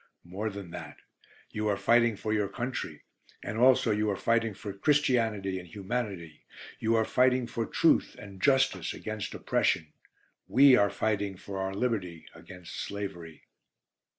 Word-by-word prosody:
More 95 +5 -4
than 100 -4 -8
that, 75 -4 -8 0.5
you 110 0 -2
are 100 -1 +1
fighting 115 +3 +3
for 110 +2 -3
your 105 -2 +1
country, 120 +6 -5 0.4
and 110 - -4
also 125 -2 +5
you 105 0 +1
are 100 - 0
fighting 115 0 0
for 100 0 -7
Christianity 110 -6 +1
and 90 - -11
Humanity. 95 -5 -5 0.4
You 115 +1 +1
are 110 -1 +2
fighting 125 +1 +3
for 115 -1 -3
truth - - +2
and 100 -2 -11
justice 135 -2 +2
against 110 -1 -5
oppression. 80 -1 0 0.5
We 135 +2 +7
are 100 -4 +4
fighting 100 -3 -1
for 95 +1 -7
our 95 0 -3
liberty 100 -8 -2
against 90 -2 -11
slavery. 85 -6 -6
105 Hz, 150 wpm, -29 LUFS, 95-115 Hz, 0.5 s, We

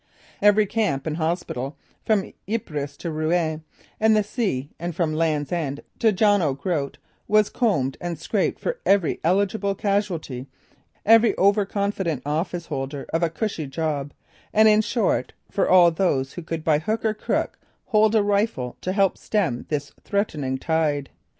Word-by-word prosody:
Every 210 +1 +5
camp 190 -11 -1
and 155 -1 -2
hospital 160 -5 -2 0.3
from 210 -3 0 0.2
Ypres 145 -10 -3
to 170 - -4
Rouen 155 0 0 0.4
and 220 0 +4
the 210 - +3
sea 195 - -2
and 170 0 -4
from 160 -3 0
Land's 155 -3 0
End 150 -5 -2 0.2
to 225 -2 +4
John 205 0 +3
O' 145 -5 +1
Groat 145 -3 -2 0.3
was 215 -1 +3
combed 145 - 0
and 175 -2 -3
scraped 195 +6 -1
for - - -3
every 195 -5 +2
eligible 200 +3 +1
casualty, 185 -11 -2 0.6
every 225 +1 +5
overconfident 200 - +1
office 165 +3 -2
holder 140 -2 -4
of 165 - +1
a 170 - +2
"cushy" 165 -3 -3
job, 145 0 -2 0.4
and 220 +1 +5
in 215 0 +6
short, 220 -1 0 0.2
for 200 - +1
all 180 -2 +7
those 145 -6 0
who 175 - -6
could 165 -1 -5
by 155 -2 +3
hook 215 +8 -2
or 220 - +2
crook 215 - -2 0.3
hold 215 0 +3
a 215 - +4
rifle 200 - 0
to 185 - -2
help 195 -1 +2
stem 180 - -1
this 145 -2 -2
threatening 150 -10 -1
tide. 150 -2 0
175 Hz, 155 wpm, -24 LUFS, 150-205 Hz, 0.6 s, all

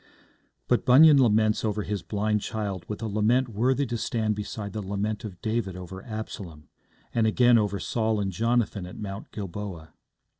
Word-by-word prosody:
But - - +2
Bunyan 140 +2 +7
laments 110 -2 +3
over 105 -1 -1
his 105 -2 -3
blind 105 +1 -1
child 100 -5 -4
with 105 +2 -5
a - - -1
lament 110 +5 +2
worthy 125 +6 +1
to 120 -2 -3
stand 110 -2 0
beside 105 0 -5
the 110 - -3
lament 100 +2 -3
of 95 -5 -8
David 110 -4 -1
over 95 +1 -8
Absalom, 95 - -7 0.4
and 115 -2 +2
again 120 +1 +5
over 100 -2 -1
Saul 110 -2 0
and 100 -1 -1
Jonathan 110 -1 0
at 90 - -10
Mount 100 -1 -7
Gilboa. 95 -5 -6
105 Hz, 165 wpm, -26 LUFS, 100-115 Hz, 0.4 s, Bunyan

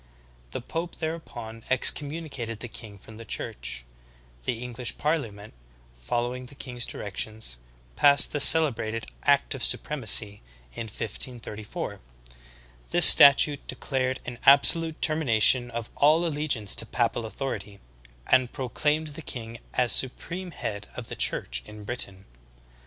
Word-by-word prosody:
The - - -7
pope 165 +7 -6
thereupon 120 -9 -8
ex 130 -1 +4
communicated 140 -7 -7
the 120 - -7
king 110 -3 -11
from 110 +3 -15
the 115 - -10
Church. 60 - -4 0.6
The 120 +1 -4
EngMsh 125 0 -2
parli 150 -5 -2
ament, 100 +1 -14 0.5
following 120 - -4
the 140 - -13
king's 125 -3 -5
directions, 105 - -3 0.4
passed 140 - +4
the 145 - -3
celebrated 115 -8 +5 0.2
Act 140 -1 +1
of 135 - -5
Supremacy 110 -7 +2 0.3
in 115 - -7
1534. 110 0 -3 0.9
This - - +7
statute 140 +1 +7
declared 130 0 -3
an 120 -1 -8
abso 140 +4 +7
lute 165 -1 -7
termination 125 -5 +2
of 120 -1 -7
all 155 +4 +2
allegiance 145 -10 -1
to 115 - +5
papal 120 0 -2
authority, 105 -5 -7 0.5
and 130 -2 +1
pro 130 -3 -7
claimed 155 +4 -2
the 150 +2 -9
king 115 -5 -8 0.2
as 125 -2 +1
supreme 175 +8 0
head 105 -10 -7
of 120 -2 -8
the - - -7
Church - - -1
in 105 0 -12
Britain. 100 -4 -4
125 Hz, 135 wpm, -25 LUFS, 110-145 Hz, 0.9 s, This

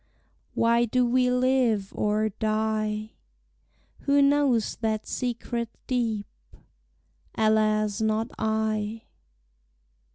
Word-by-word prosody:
Why 235 +1 +3
do 250 +2 +1
we 250 +1 +2
live 250 -5 +1
or 215 +1 0
die? 215 0 -1 0.9
Who 280 0 +2
knows 280 -5 +2
that 220 -1 -2
secret 235 -2 -3 0.2
deep? 225 -5 -1 1.1
Alas 215 -1 +2
not 220 +1 0
I! 220 0 -1
220 Hz, 85 wpm, -26 LUFS, 215-245 Hz, 1.1 s, Why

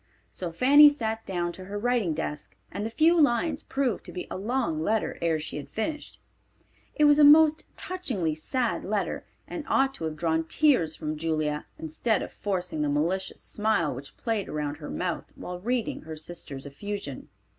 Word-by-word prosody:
So 175 -2 -2
Fanny 285 - +8
sat 225 -6 -3
down 175 -2 -1
to 185 +2 -10
her 200 +2 -5
writing 225 -7 +1
desk, 140 -12 -4 0.2
and 205 - -4
the 220 - -2
few 320 +7 +4
lines 285 +2 +2
proved 265 -5 -1
to - - -8
be 180 - -5
a - - -3
long 210 -5 -1
letter 215 +6 0
ere 165 -2 +2
she 155 -1 -5
had 140 -1 -7
finished. 295 - -4 0.8
It 300 - +2
was 295 0 +6
a - - +8
most 310 +1 +7
touchingly 250 - -2
sad 235 - -1
letter, 205 +1 -2 0.2
and 330 - -5
ought 270 0 +2
to 165 - -5
have 155 -1 -3
drawn 160 0 0
tears 250 - +3
from 155 0 -4
Julia, 155 -1 -1
instead 160 +8 0
of - - -7
forcing 180 -6 -2
the 150 - +1
malicious 170 +7 -1
smile 210 -8 0
which 135 +3 -10
played 225 -4 -2
around 150 -1 -3
her 150 -1 -8
mouth 180 -2 -2
while 180 0 -6
reading 235 +3 -1
her 160 0 -7
sister's 155 -4 -5
effusion. 145 0 -6
190 Hz, 180 wpm, -27 LUFS, 155-250 Hz, 0.8 s, Fanny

